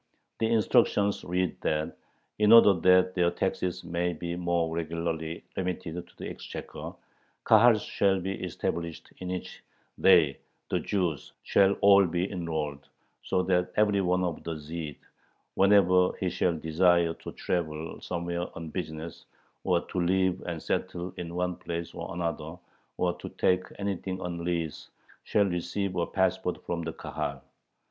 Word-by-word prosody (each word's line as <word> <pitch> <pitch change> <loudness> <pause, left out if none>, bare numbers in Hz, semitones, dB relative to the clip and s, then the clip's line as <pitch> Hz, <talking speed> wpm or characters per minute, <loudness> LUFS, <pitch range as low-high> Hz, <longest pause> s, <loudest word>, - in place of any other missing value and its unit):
The 110 - +2
instructions 100 -2 +3
read 90 +1 -1
that 75 0 -1 0.4
in 105 0 +5
order 115 -3 +9
that 90 +1 +4
their 90 -2 +3
taxes 90 +1 -2
may 85 +1 -1
be 85 +1 -4
more 85 -2 0
regularly 85 0 -3
remitted 90 -3 -3
to - - -24
the - - -6
exchequer, - - -7 0.5
Kahals 110 0 +6
shall 95 -1 +2
be 95 +2 -3
established 85 -1 -4
in 90 - -6
which 90 0 -5 0.4
they - - +5 0.3
[the - - +2
Jews] 90 -8 -2
shall 100 0 +4
all 100 -1 +7
be 90 +3 -1
enrolled, 80 -6 -3 0.3
so 90 - 0
that 90 -1 +1
every 105 -2 +3
one 90 0 +1
of 85 -3 -3
the 85 -1 -4
"Zhyds," 75 -1 -6 0.6
whenever 95 -2 +5
he 90 -2 -1
shall 85 -1 +1
desire 85 +1 +3
to - - -9
travel 80 -2 -3
somewhere 85 0 -3
on 80 -1 -6
business, 80 -1 -6 0.4
or 90 -2 +2
to 90 - -4
live 95 +1 +2
and 85 -2 -3
settle 90 +1 -2
in 85 -1 -6
one 90 0 -1
place 85 0 -5
or - - -6
another, 85 -2 -3 0.4
or 90 -1 +1
to - - -7
take 90 0 +1
anything 95 -2 -3
on 85 -2 -4
lease, 85 -3 -3 0.4
shall 105 - +3
receive 90 +1 -2
a 85 -1 0
passport 95 -1 0
from 85 -1 -2
the 80 -1 -4
Kahal. - - -5
90 Hz, 150 wpm, -28 LUFS, 85-95 Hz, 0.6 s, order